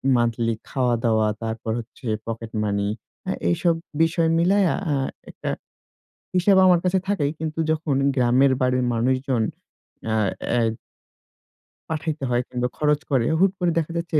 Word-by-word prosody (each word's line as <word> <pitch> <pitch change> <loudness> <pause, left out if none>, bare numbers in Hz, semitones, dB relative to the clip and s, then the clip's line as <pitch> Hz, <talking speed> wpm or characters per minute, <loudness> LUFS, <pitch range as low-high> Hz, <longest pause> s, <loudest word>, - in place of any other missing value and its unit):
monthly 115 -1 +1 0.2
খাওয়া-দাওয়া, 115 -4 +1 0.2
তারপর 110 0 -3
হচ্ছে 120 +2 -10 0.2
পকেট 115 0 -5
মানি 100 -1 0 0.4
আ - - +2 0.2
এইসব 170 - +2 0.3
বিষয় 165 0 +2
মিলাইয়া 190 +1 +3 0.2
আ - - +2 0.4
একটা - - -5 0.9
হিসেব 190 +2 +4
আমার 180 -2 +5
কাছে 185 +1 +3
থাকেই 150 -8 +1
কিন্তু 160 0 -4
যখন 155 -2 0 0.2
গ্রামের 130 +1 +4
বাড়ির 125 0 +2
মানুষজন 130 0 +1 0.7
আ - - +1 0.3
অ্যা 120 - +2 1.3
পাঠাইতে 155 -2 -3
হয় 120 0 +2
কিংবা 125 0 -1
খরচ 150 -1 +2
করে। 130 -4 +3
হুট 195 +1 +5
করে 175 -2 +2
দেখা 165 0 -3
যাচ্ছে 170 -2 0
135 Hz, 135 wpm, -23 LUFS, 120-165 Hz, 1.3 s, আমার